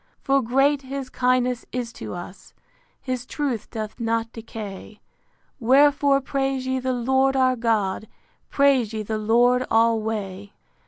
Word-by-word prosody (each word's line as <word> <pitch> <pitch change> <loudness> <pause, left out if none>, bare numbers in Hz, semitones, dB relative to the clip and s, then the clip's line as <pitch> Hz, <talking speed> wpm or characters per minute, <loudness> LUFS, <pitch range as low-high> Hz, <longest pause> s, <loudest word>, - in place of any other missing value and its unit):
For 275 -1 +3
great 270 +4 +2
his 270 -1 -6
kindness 250 -1 +1
is 245 -2 -4
to 110 -1 -7
us; 175 +2 -10 0.4
His 255 -2 -4
truth 255 -4 -3
doth 215 +1 -6
not 230 0 -1
decay: 215 -2 -9 0.6
Wherefore 275 +2 +4
praise 270 -1 -2
ye 260 0 -1
the 260 0 -1
Lord 265 +2 +1
our 255 -1 +3
God; 220 -3 -1 0.4
Praise 270 -6 +3
ye 215 -1 -3
the 215 +1 -3
Lord 240 +4 +3
alway. 215 -3 0
245 Hz, 130 wpm, -23 LUFS, 220-265 Hz, 0.6 s, Wherefore